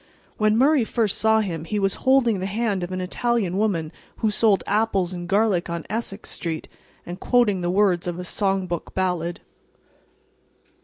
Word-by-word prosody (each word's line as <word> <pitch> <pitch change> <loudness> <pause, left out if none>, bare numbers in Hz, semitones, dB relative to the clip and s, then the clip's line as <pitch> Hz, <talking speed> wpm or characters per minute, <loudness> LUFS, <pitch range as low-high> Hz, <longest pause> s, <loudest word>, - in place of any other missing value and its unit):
When 215 0 +3
Murray 275 +1 +4
first 220 -2 -1
saw 220 0 +4
him 170 -6 -4
he 185 +6 -3
was 195 -1 +1 0.2
holding 240 -6 +4
the 190 - -2
hand 205 -1 -1
of 175 - -5
an 185 0 -3
Italian 200 0 -1
woman 190 -7 0 0.3
who 220 - +1
sold 210 -2 +3
apples 200 -3 +1
and 175 -1 -6
garlic 200 -4 +2
on 170 -1 -4
Essex 215 -2 -4
street, 165 -2 -4 0.4
and 175 +2 -7
quoting 225 -7 +2
the 175 - -1
words 185 -2 +2
of 175 -1 -3
a 180 - -5
song 195 +1 0
book 175 -2 -5
ballad. 180 -2 -1
195 Hz, 170 wpm, -23 LUFS, 175-220 Hz, 0.4 s, Murray